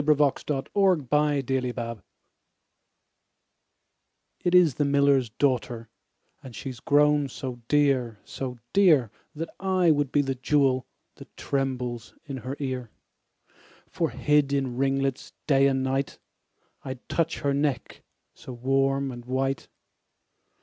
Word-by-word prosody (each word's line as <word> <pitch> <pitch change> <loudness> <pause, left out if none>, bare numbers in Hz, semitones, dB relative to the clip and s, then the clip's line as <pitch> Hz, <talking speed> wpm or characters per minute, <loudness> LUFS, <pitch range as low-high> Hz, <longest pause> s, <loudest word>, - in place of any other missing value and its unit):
The 150 +1 +4
Miller's 145 -2 +1
Daughter 135 - 0 2.4
IT 175 0 +2
is 175 -6 +6
the 145 - 0
miller's 140 -3 +3
daughter, 120 -2 -1 0.5
And 130 -3 -11
she 135 - -5
is 120 - -11
grown 145 0 +3
so 125 -1 -6
dear, 135 -6 +2
so 125 -2 -6 0.2
dear, 155 - +4 0.2
That 165 +2 -5
I 185 -3 +3
would 145 -3 +1
be 145 - +3
the 135 -1 -1
jewel 130 -1 +1 0.3
That - - -15
trembles 125 -4 -3
in 140 -3 -5
her 130 +2 -5
ear: 130 -4 -3 1.0
For 165 -2 -2
hid 145 +3 +2
in 135 -3 -1
ringlets 135 0 -1
day 140 -2 +4
and 135 -1 +1
night, 135 +1 -1 0.6
5 - - -32
I'd 130 -2 -7
touch 165 -1 -1
her 140 -1 +1
neck 140 -1 -2 0.3
so 130 - -10
warm 135 +2 0
and 120 -1 -9
white. 135 +1 -1
135 Hz, 125 wpm, -26 LUFS, 130-145 Hz, 2.4 s, is